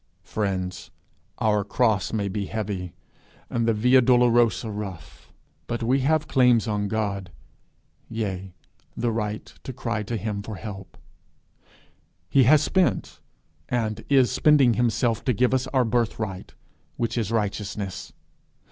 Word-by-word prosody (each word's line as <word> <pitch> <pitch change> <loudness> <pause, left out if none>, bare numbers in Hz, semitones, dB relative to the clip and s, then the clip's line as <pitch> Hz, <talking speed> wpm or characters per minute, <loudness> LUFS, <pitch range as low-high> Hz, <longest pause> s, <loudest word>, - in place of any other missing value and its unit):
Friends, 95 -3 -3 0.5
our 105 -2 +2
cross 105 -1 +1
may 105 -3 -1
be 100 0 -3
heavy, 100 -5 -4 0.6
and 115 -1 0
the 115 - +3
via 125 +4 +5
dolorosa 120 -2 +3
rough; 100 -4 -8 0.4
but 120 0 -3
we 130 +4 +2
have 155 +3 +1
claims 125 -5 +4
on 105 -1 -1
God, 100 -3 -2 0.8
yea 95 -5 -4 0.4
the 120 0 0
right 105 -1 -3 0.2
to - - -5
cry 115 -3 -3
to 115 +3 -3
him 105 -1 -3
for 110 +1 -7
help. 95 -2 -9 1.3
He 135 -2 +5
has 150 +4 +6
spent, 185 +1 0 0.5
and 110 -3 -1
is 135 -3 +4
spending 140 -6 +4
himself 115 -1 +1
to 125 - +2
give 125 +4 +2
us 130 0 +1
our 130 -2 +2
birthright, 110 -4 -2 0.4
which 115 - -1
is 115 -3 -1
righteousness. 105 -2 -3
110 Hz, 130 wpm, -25 LUFS, 100-125 Hz, 1.3 s, has